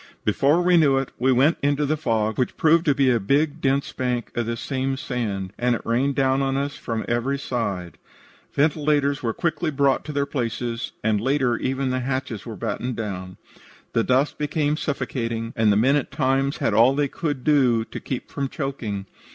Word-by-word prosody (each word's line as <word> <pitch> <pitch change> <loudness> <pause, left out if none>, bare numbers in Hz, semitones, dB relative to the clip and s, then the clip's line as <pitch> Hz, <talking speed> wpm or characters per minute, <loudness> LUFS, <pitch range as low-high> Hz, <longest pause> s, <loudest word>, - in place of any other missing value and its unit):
"Before 140 - +3
we 180 0 +5
knew 140 -5 +4
it, 135 -1 -2
we 130 +2 +3
went 135 +6 +3
into 145 +1 +1
the 150 +2 +1
fog, 110 -7 -1
which 125 - -1
proved 160 +1 +4
to 145 -4 +3
be 135 -2 +3
a 120 - +2
big 145 +8 +1
dense 135 +1 +1
bank 125 -3 -2
of 120 -1 -2
this 115 0 -3
same 135 0 -2
sand, 100 -8 -3
and 125 0 +2
it - - -7
rained 130 +4 +1
down 135 0 +2
on 135 0 0
us 140 +1 -2
from 115 -2 -4
every 120 +4 0
side. 105 -10 -3 0.5
Ventilators 145 -1 +1
were 115 - 0
quickly 170 +4 -1
brought 140 -2 +2
to 155 - -5
their 140 -1 0
places, 120 -3 -3
and 105 -2 +1
later 130 -1 +1
even 130 0 -1
the 130 - 0
hatches 130 -4 -3
were 115 - -6
battened 125 +5 -3
down. 95 -4 -5 0.6
The 115 - +2
dust 130 +4 +1
became 150 0 0
suffocating, 115 -6 -3
and 110 -2 +3
the 100 - +3
men 130 +6 +4
at 145 - -1
times 135 0 0
had - - 0
all 120 +5 +5
they 145 0 +1
could 145 -3 -3
do 130 -7 +3
to - - -7
keep 130 - -5
from 140 -2 -2
choking. 120 -10 -4
130 Hz, 195 wpm, -23 LUFS, 115-140 Hz, 0.6 s, we